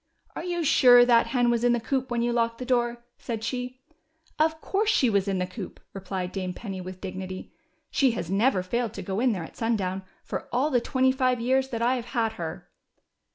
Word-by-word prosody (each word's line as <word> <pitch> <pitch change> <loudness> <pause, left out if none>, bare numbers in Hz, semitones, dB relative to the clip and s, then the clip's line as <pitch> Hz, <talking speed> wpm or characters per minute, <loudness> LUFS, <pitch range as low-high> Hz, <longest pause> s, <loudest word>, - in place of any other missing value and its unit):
Are - - -5
you 345 -1 -2
sure 245 -4 +7
that 235 -1 +4
hen 245 -2 +2
was 235 0 0
in 245 0 +4
the 240 - +1
coop 260 +2 -2
when 240 -1 0
you 240 0 +1
locked 230 -1 0
the 255 - -6
door? 240 -1 0
" - - -53
said 225 -3 -3
she. 250 +1 -4 0.6
Of 315 0 +2
course 415 +6 0
she 260 - +3
was 200 -1 +1
in 195 -1 0
the 180 - 0
coop," 185 +1 -8
replied 190 -1 -4
Dame 185 -2 -3
_ - - -21
Penny 195 -4 -6
with 185 0 -8
dignity. 185 -1 -6 0.4
She 270 -3 +3
has 175 -7 -4
never 195 +2 +2
failed 235 +4 -2
to - - -5
go 195 0 -3
in 250 +1 +3
there 185 -6 -3
at - - -11
sundown 195 -5 -1 0.2
for - - -5
all 270 +5 +1
the 245 -3 +3
twenty 260 +1 +2
five 255 -2 +1
years 260 +3 +1
that 230 -3 -2
I've 245 0 +1
had 225 -1 +2
her." 160 -1 -6
235 Hz, 225 wpm, -26 LUFS, 195-255 Hz, 0.6 s, sure